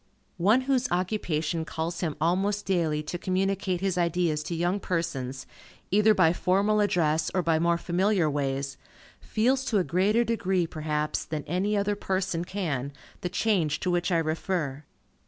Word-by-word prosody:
One 210 +9 +4
whose 260 -1 +1
occupation 175 -3 -1
calls 165 +1 -4
him 160 -4 -2
almost 195 +6 +1
daily 165 -5 0
to 170 +3 -5
communicate 190 -1 -1
his 190 -2 0
ideas 170 -2 +1
to 170 - -3
young 175 +4 0
persons, 135 -8 -3 0.5
either 210 +2 +5
by 165 -3 +4
formal 200 +4 +2
address, 160 -6 +2
or 185 - +2
by 165 -1 +2
more 170 +1 +2
familiar 180 +1 +1
ways, 140 -1 -2 0.4
feels 255 +5 +1
to 220 - +1
a 190 - +3
greater 200 +7 +2
degree, 190 -6 0
perhaps, 150 -1 -2
than 155 -2 -4
any 195 +5 0
other 205 +1 +1
person 190 -3 -1
can, 155 -8 -3 0.3
the 180 - -2
change 180 -6 +1
to 180 - 0
which 175 +1 0
I 170 - +3
refer. 155 -3 -2
175 Hz, 155 wpm, -27 LUFS, 160-195 Hz, 0.5 s, either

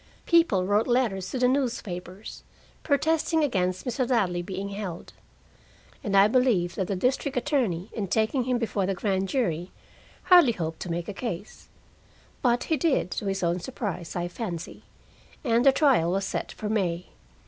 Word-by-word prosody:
People 330 - +3
wrote 205 +3 +2
letters 230 -7 +1
to - - -3
the 250 0 +3
newspapers, 215 -8 -3 0.4
protesting 320 +2 +1
against 185 -9 0
Mr. 245 0 -1
Ladley 185 -8 +1
being 195 +2 -5
held. 195 -4 -6 0.9
And 200 -2 +1
I 195 +1 +7
believe 220 -8 +2
that 190 - -2
the 195 - -1
district 255 +6 0
attorney, 225 - 0
in 210 -3 -3
taking 220 +6 +1
him 250 -1 +1
before 210 -5 -1
the 195 - 0
grand 195 0 0
jury, 180 - -1 0.5
hardly 350 -10 +6
hoped 165 -4 -4
to 180 - -6
make 170 0 -3
a 205 - -4
case. 205 -3 -6 0.7
But 245 -2 +2
he 320 - 0
did, 290 - +1
to 200 - -3
his 195 -1 -1
own 170 +1 +1
surprise, 180 -6 -5
I 175 0 -1
fancy, 175 -3 -6 0.6
and 235 -3 +2
the - - +9
trial 265 - +3
was 195 0 0
set - - -3
for 215 - -6
May. 180 -5 -1
205 Hz, 165 wpm, -26 LUFS, 180-250 Hz, 0.9 s, the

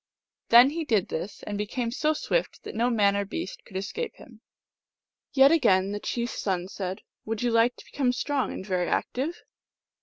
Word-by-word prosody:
Then 240 +4 +8
he 330 +2 -2
did 220 - +1
this, 190 +5 -5
and 205 -1 -4
became 230 +3 -2
so 305 +5 +1
swift - - -2
that - - -7
no 235 +3 +1
man 205 -4 +3
or 200 - +1
beast 335 - -6
could 190 - -7
escape 430 - -4
him. - - -16 0.9
Yet 275 +1 +6
again 200 - +3
the 205 - -3
chief 235 +2 -2
s - - -6
son 185 -2 -1
said, 190 -1 -5
" - - -59
Would 225 +1 -2
you 240 - +2
like 230 +2 +3
to - - -14
become 260 -3 0
strong 270 +2 -1
and - - -6
very 185 -3 0
active 290 +7 -2
230 Hz, 200 wpm, -27 LUFS, 200-270 Hz, 0.9 s, Then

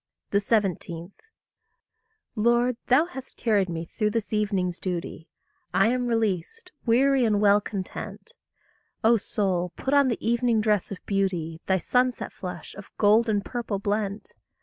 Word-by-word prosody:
17. 195 -4 0 1.2
Lord, 240 +2 +2
thou 265 +6 +5
hast 265 -7 -8
carried 205 -5 +1
me 165 0 -4
through 210 +5 -1
this 220 0 -3
evening's 195 -4 0
duty; 175 -3 -5 0.5
I 220 - +5
am 250 0 0
released, 225 - -1 0.2
weary, 265 +3 +4
and 215 -3 +2
well 205 0 +5
content. 200 0 -6 0.7
O 230 +1 +5
soul, 185 -4 -1
put 265 - -2
on 285 -1 +5
the 235 - 0
evening 235 -1 +2
dress 210 -3 +1
of 200 - -4
beauty, 175 -5 -1
Thy 190 - +3
sunset 250 +7 0
flush, 180 -3 -7
of 200 0 -11
gold 220 +2 +4
and 205 -2 0
purple 235 -4 -3
blent! 205 +1 -2
210 Hz, 140 wpm, -26 LUFS, 190-235 Hz, 1.2 s, thou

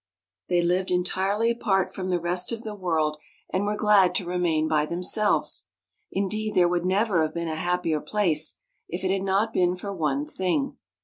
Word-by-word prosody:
They 175 -1 +2
lived 180 +2 +1
en 180 0 +2
tirely 200 +5 +1
apart 195 -5 0
from 185 -1 -4
the 180 -1 +1
rest 180 +3 0
of 230 0 -4
the 215 - -5
world, 160 -6 0 0.4
and 190 +2 +1
were 210 +1 0
glad 205 -3 +4
to 185 - 0
remain 170 -3 0
by 155 -1 +1
themselves. 180 +5 +1 0.4
Indeed 215 +2 -2
there 180 -1 +5
would 175 0 0
never 190 -1 +2
have 155 +1 -1
been 170 0 -2
a - - -2
hap 180 +2 -1
pier 155 -3 0
place, 160 -4 0 0.3
if 175 +3 -5
it 185 - +1
had 195 0 0
not 195 +3 +1
been 180 0 +2
for 200 +2 -6
one 150 -5 -1
thing. 190 - -2
180 Hz, 195 wpm, -25 LUFS, 170-200 Hz, 0.4 s, there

